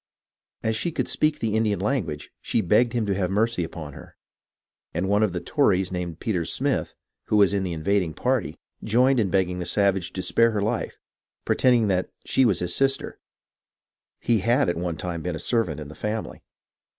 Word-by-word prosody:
As 110 0 0
she 170 +9 -1
could 165 - -2
speak 155 0 +1
the 110 -2 -1
Indian 110 -2 +1
language, 80 - -2
she - - 0
begged 110 +6 +3
him 120 -3 0
to 100 - 0
have 95 -2 -1
mercy 105 -1 +1
upon 80 -3 -7
her; - - -13 0.8
and 90 +3 0
one 100 +2 +2
of 105 -3 +2
the 90 - -3
Tories 95 - +1
named 90 -3 -4
Peter 95 -7 -1
Smith, - - -1 0.3
who 105 - +1
was 100 -1 +5
in 100 - +1
the 95 -2 -3
invading 85 0 0
party, 125 - -1 0.3
joined 125 +4 +3
in 105 -4 +1
begging 90 -1 0
the 90 - -3
savage 100 -3 +1
to 95 - -3
spare 115 0 +3
her 105 - 0
life, 110 +2 -2 0.5
pretending 120 -4 +3
that.she 95 +7 0
was 100 -7 +2
his 90 0 0
sister 135 0 0 1.0
(he 115 -2 +2
had 120 +6 +2
at 85 - 0
one 85 -1 -3
time 85 -1 -4
been 90 0 -3
a - - -4
servant 90 - -1
in 75 - -7
the 75 - -10
family). 105 +5 -4
100 Hz, 190 wpm, -25 LUFS, 90-115 Hz, 1.0 s, was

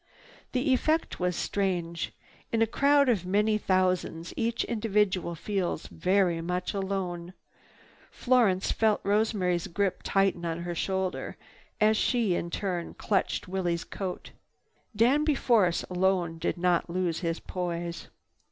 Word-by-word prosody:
The 260 +1 +2
effect 315 +5 0
was 180 -1 0
strange. 175 -5 -2 0.4
In 225 0 +3
a - - +4
crowd 280 +4 +3
of 220 -8 +2
many 210 +3 +2
thousands 185 -3 0
each 230 0 0
individual 210 -6 0
feels 185 -1 -2
very 185 -3 +1
much 180 +2 -2
alone. 190 -3 -3 0.8
Florence 230 -7 +2
felt 220 -2 +2
Rosemary's 200 -4 +1
grip 195 +1 -1
tighten 195 -3 +1
on 165 0 -2
her 175 0 -3
shoulder 190 +2 -2 0.4
as 215 0 +4
she, 230 -7 +2
in 170 - -2
turn, 180 -2 -3
clutched 195 -3 0
at - - -13
Willie's 175 -3 -1
coat. 185 -2 -6 0.6
Danby 285 +7 +3
Force 205 -11 +2
alone 180 -2 0
did 170 - -1
not 175 -1 +1
lose 175 -2 -1
his 165 -2 -2
poise. 170 -2 -4
190 Hz, 130 wpm, -28 LUFS, 175-215 Hz, 0.8 s, a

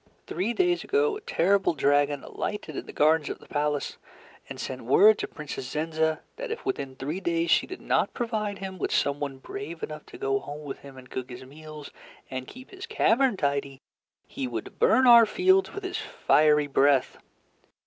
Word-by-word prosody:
Three 190 +7 -2
days 355 +6 +1
ago 440 0 +1
a - - -13
terrible 195 - +2
dragon 145 0 +2
alighted 205 -8 -5
in - - -6
the - - -7
gardens 155 0 +3
of - - -4
the - - -17
palace 150 -1 -2 0.5
and - - -8
sent 130 -1 -5
word 210 - +6
to - - -2
Princess 140 -4 -7
Zenza 160 0 -1 0.2
that - - -5
if 450 +2 -5
within 135 - -3
three 150 +7 -4
days 170 -2 0
she - - +4
did 370 - -8
not - - 0
provide 215 -4 -2
him 190 -1 -7
with - - -2
someone 140 -1 0
brave 405 - -8
enough 440 - -7
to 410 -4 -11
go 405 +1 0
home 150 - -8
with 140 -2 -7
him 140 -1 -13
and 125 -1 -14
cook 130 0 -5
his 125 +1 -9
meals 150 +1 -11 0.4
and 130 -1 -5
keep 255 +6 -12
his 380 -1 -8
cavern 240 -1 +2
tidy, 140 -2 -1 0.5
he 130 - -5
would 115 -3 -6
burn 260 - +4
our 235 -2 +8
fields 375 - +3
with 400 - -7
his 375 -1 -3
fiery 150 -1 +3
breath. 140 -1 +2
160 Hz, 190 wpm, -27 LUFS, -, 0.5 s, our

